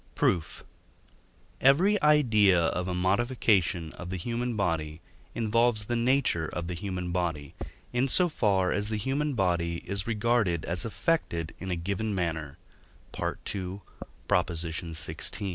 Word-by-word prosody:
Proof. 85 Hz, -4 st, 0 dB, 1.0 s
Every 185 Hz, +10 st, +4 dB
idea 110 Hz, -11 st, +5 dB
of 90 Hz, +2 st, 0 dB
a 90 Hz, -, -2 dB
modification 95 Hz, -4 st, +1 dB
of 90 Hz, -, -8 dB
the 95 Hz, -, -3 dB
human 120 Hz, +5 st, -2 dB
body 80 Hz, -6 st, -1 dB, 0.4 s
involves 115 Hz, -1 st, +1 dB
the 120 Hz, -, -2 dB
nature 120 Hz, -, +2 dB
of 85 Hz, +2 st, -4 dB
the 90 Hz, -, -4 dB
human 90 Hz, 0 st, -4 dB
body, 85 Hz, -5 st, -2 dB, 0.4 s
in 125 Hz, +2 st, +2 dB
so 180 Hz, +7 st, +5 dB
far 100 Hz, -, +1 dB
as 105 Hz, 0 st, -1 dB
the 110 Hz, -, -1 dB
human 140 Hz, +5 st, -1 dB
body 85 Hz, -4 st, 0 dB
is 100 Hz, +1 st, -3 dB
regarded 110 Hz, -6 st, +1 dB
as 85 Hz, +3 st, -1 dB
affected 105 Hz, -, -1 dB
in 95 Hz, -, -6 dB
a 90 Hz, -, 0 dB
given 100 Hz, +5 st, -2 dB
manner 80 Hz, -5 st, -3 dB, 0.6 s
(II. 95 Hz, -1 st, -3 dB, 0.5 s
xvi.). 85 Hz, +2 st, -1 dB
95 Hz, 130 wpm, -28 LUFS, 85-115 Hz, 1.0 s, idea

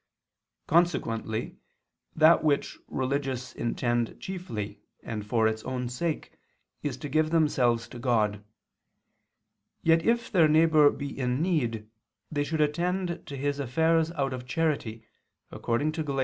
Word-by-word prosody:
Consequently 115 Hz, -10 st, 0 dB, 0.6 s
that 160 Hz, +1 st, +6 dB
which 145 Hz, -2 st, 0 dB
religious 130 Hz, -1 st, -2 dB
intend 120 Hz, 0 st, -1 dB
chiefly 175 Hz, -, -6 dB, 0.2 s
and 110 Hz, -2 st, -4 dB
for 110 Hz, 0 st, +3 dB
its 110 Hz, 0 st, -2 dB
own 125 Hz, -1 st, -3 dB
sake 155 Hz, +6 st, -3 dB, 0.5 s
is 140 Hz, -4 st, -3 dB
to 145 Hz, -, -6 dB
give 155 Hz, +2 st, +1 dB
themselves 130 Hz, -8 st, +2 dB
to 120 Hz, -, -9 dB
God. 105 Hz, -4 st, +1 dB, 1.4 s
Yet 165 Hz, 0 st, +4 dB
if 235 Hz, +2 st, +1 dB
their 170 Hz, -6 st, +5 dB
neighbor 155 Hz, -1 st, +5 dB
be 140 Hz, -1 st, -5 dB
in 125 Hz, -1 st, -1 dB
need, 120 Hz, -, 0 dB, 0.4 s
they 145 Hz, -2 st, 0 dB
should 155 Hz, +1 st, -1 dB
attend 175 Hz, +3 st, -1 dB
to 140 Hz, -, -6 dB
his 145 Hz, +1 st, -1 dB
affairs 160 Hz, +5 st, +2 dB
out 135 Hz, -5 st, -1 dB
of 125 Hz, -1 st, -7 dB
charity, 125 Hz, -8 st, -1 dB, 0.5 s
according 130 Hz, +6 st, -1 dB
to 160 Hz, 0 st, -3 dB
Gal. 140 Hz, -2 st, -2 dB
140 Hz, 135 wpm, -28 LUFS, 120-160 Hz, 1.4 s, that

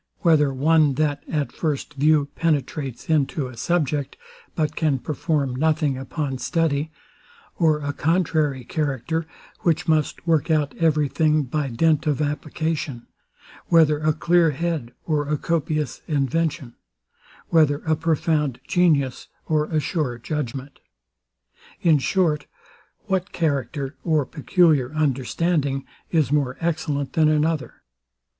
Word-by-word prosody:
whether 155 Hz, -6 st, +4 dB
one, 150 Hz, +1 st, +3 dB
that 145 Hz, 0 st, 0 dB
at 150 Hz, -3 st, -1 dB
first 150 Hz, -4 st, -3 dB
view 145 Hz, 0 st, +3 dB
penetrates 145 Hz, -4 st, -2 dB
into 150 Hz, -2 st, +1 dB
a 125 Hz, -1 st, -8 dB
subject, 145 Hz, 0 st, -1 dB, 0.4 s
but 155 Hz, -1 st, -1 dB
can 150 Hz, -4 st, +1 dB
perform 145 Hz, -1 st, -1 dB
nothing 155 Hz, 0 st, +1 dB
upon 135 Hz, 0 st, -4 dB
study; 160 Hz, -2 st, 0 dB, 0.7 s
or 160 Hz, -3 st, +4 dB
a 145 Hz, 0 st, -3 dB
contrary 155 Hz, -5 st, 0 dB
character, 155 Hz, +3 st, -2 dB, 0.3 s
which 165 Hz, -3 st, 0 dB
must 155 Hz, -1 st, 0 dB
work 165 Hz, -2 st, +2 dB
out 150 Hz, -3 st, +1 dB
every 155 Hz, -3 st, +2 dB
thing 155 Hz, +1 st, +2 dB
by 140 Hz, +2 st, -2 dB
dint 155 Hz, +6 st, +2 dB
of 150 Hz, -2 st, +1 dB
application? 150 Hz, -3 st, -3 dB, 0.6 s
whether 155 Hz, -3 st, +4 dB
a 155 Hz, 0 st, +2 dB
clear 170 Hz, +2 st, +3 dB
head, 155 Hz, -4 st, -2 dB
or 150 Hz, -3 st, 0 dB
a 150 Hz, -, +1 dB
copious 155 Hz, -3 st, -2 dB
invention? 145 Hz, -2 st, -1 dB, 0.8 s
whether 155 Hz, -3 st, +3 dB
a 160 Hz, -1 st, +2 dB
profound 155 Hz, -4 st, 0 dB
genius, 150 Hz, -8 st, +2 dB, 0.2 s
or 155 Hz, -1 st, +1 dB
a 155 Hz, 0 st, 0 dB
sure 150 Hz, -6 st, -2 dB
judgment? 135 Hz, +1 st, -5 dB, 1.0 s
in 160 Hz, -4 st, +4 dB
short, 150 Hz, +1 st, +1 dB, 0.6 s
what 190 Hz, -2 st, -1 dB
character, 140 Hz, -3 st, -2 dB
or 155 Hz, -4 st, +2 dB
peculiar 150 Hz, -3 st, +2 dB
understanding, 140 Hz, 0 st, 0 dB, 0.2 s
is 155 Hz, -6 st, +1 dB
more 140 Hz, -3 st, +1 dB
excellent 155 Hz, -4 st, -2 dB
than 155 Hz, -1 st, +4 dB
another? 155 Hz, 0 st, -1 dB
150 Hz, 125 wpm, -23 LUFS, 140-160 Hz, 1.0 s, whether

